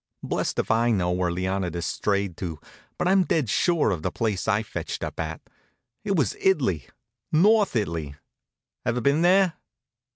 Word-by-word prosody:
Blessed - - -2
if - - 0
I 115 +1 +3
know 90 -6 +1
where 90 0 0
Leonidas 90 -1 -2
strayed 100 -2 -1
to, 85 -4 -4 0.4
but - - 0
I'm 190 0 +4
dead 150 - 0
sure 170 - +2
of 85 -5 -2
the - - -2
place 110 -5 -2
I 105 0 +2
fetched - - -5
up - - -5
at. 80 0 -3 0.6
It 200 -2 0
was 145 -8 +1
It'ly, 130 - +1 0.4
North 205 - +4
It'ly. 80 -9 -2 0.7
Ever 125 -1 0
been 140 +6 +2
there? 185 0 +4
110 Hz, 160 wpm, -25 LUFS, -, 0.7 s, I'm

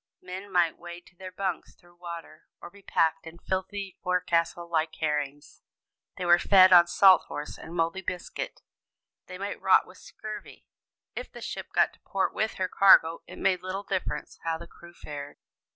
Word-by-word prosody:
Men 190 +2 -8
might 175 -3 +2
wade 175 0 -10
to - - -21
their 185 +1 -9
bunks 185 -2 -4
through 175 0 -23
water, 170 -2 -9
or - - -10
be 200 - -17
packed 160 -3 0
in 165 - -10
a 170 - -22
filthy 190 +1 -3
forecastle 175 -2 0
like 160 -1 -1
herrings; 145 -2 -3 0.6
they 180 - -3
were 175 0 +6
fed 185 -2 +6
on 175 -1 +8
"salt 185 -1 +6
horse" 150 0 -6
and 165 - -10
moldy 165 +3 0
biscuit; 185 - -6 0.6
they - - -8
might - - -5
rot - - +5
with - - -16
scurvy 215 - -10 0.5
if - - -6
the - - -10
ship - - -6
got - - +2
to - - -23
port 195 -1 -2
with 220 0 -1
her 185 - -1
cargo, 170 -4 +5
it - - -11
made 185 -2 +1
little 185 +2 -4
difference 190 -2 -4
how 165 -1 -1
the 170 - -10
crew 170 +1 -16
fared. 145 -3 -8
175 Hz, 185 wpm, -27 LUFS, 165-190 Hz, 0.6 s, on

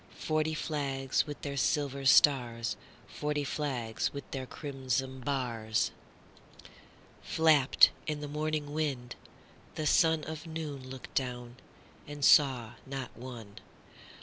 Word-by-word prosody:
Forty 155 0 0
flags 140 -3 -1
with 145 - -6
their 140 -1 -3
silver 140 -1 0
stars, 120 -4 +4 0.3
Forty 150 0 -2
flags 130 -6 -2
with 140 -1 -6
their 130 -2 -4
crimson 130 -2 -3
bars, 120 -5 -1 1.3
Flapped 155 -5 +5 0.2
in 150 -1 -2
the 150 - -5
morning 150 0 -2
wind: 135 -6 -2 0.6
the 155 - -3
sunOf 160 0 +2
noon 150 -5 -6
looked 130 -1 -9
down, 125 -2 -3 0.5
and 145 -1 -2
saw 130 -7 +5 0.2
not 135 -1 -6
one. 115 -5 -9
140 Hz, 110 wpm, -31 LUFS, 130-150 Hz, 1.3 s, Flapped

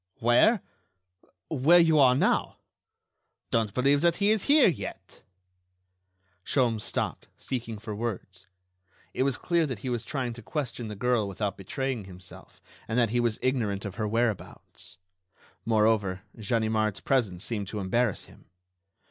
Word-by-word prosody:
Where?... 150 - +4 0.9
Where 155 +4 +5
you 165 -3 +5
are 130 -2 +6
now.... - - +1 0.9
Don't 110 -3 +1
believe 140 +5 +2
that 170 0 +3
he 200 +1 +2
is 220 -3 0
here 290 0 +6
yet!..." 170 - -5 1.2
Sholmes 120 -4 +1
stopped, - - -3
seeking 115 -4 -5
for 105 0 -7
words. 95 -4 -5 0.7
It - - -2
was 135 -1 +1
clear 170 -2 +1
that 130 -5 -4
he - - -1
was 120 -1 -2
trying 130 -4 -3
to 120 - -11
question 125 -2 -4
the 105 - -6
girl 120 0 +1
without 100 0 -3
betraying 125 +3 -4
himself, 90 -1 -13 0.3
and 110 - -2
that 115 -3 +2
he 120 - +1
was 120 -2 +1
ignorant 110 -6 0
of 100 - -5
her 105 - 0
whereabouts. 115 -5 -3 0.7
Moreover, 105 -4 +1
Ganimard's 110 -2 -1
presence 110 -10 0
seemed 105 -3 -3
to 105 +2 -5
embarrass 105 +3 0
him.... - - -19
115 Hz, 145 wpm, -27 LUFS, 105-130 Hz, 1.2 s, are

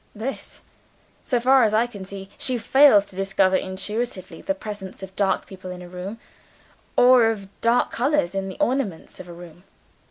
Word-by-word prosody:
"This. 235 +6 -6 0.6
So 245 - 0
far 260 +2 +5
as 215 -2 +3
I 225 +2 +3
can 205 -6 -9
see, 195 0 -9
she 255 -1 -1
fails 265 -4 +5
to 195 - -16
discover 195 0 +2
intuitively 190 +2 -3
the 290 - -2
presence 205 -7 -8
of 190 0 -9
dark 195 -1 0
people 185 -1 -10
in 180 0 -8
a - - -10
room, 180 +4 -7 0.8
or 250 -1 +7
of 210 -3 -2
dark 235 +1 +2
colors 250 - 0
in 195 0 -3
the 190 - -8
ornaments 240 -10 -2
of 185 - -9
a 175 - -9
room. 175 0 -13
200 Hz, 180 wpm, -23 LUFS, 190-240 Hz, 0.8 s, or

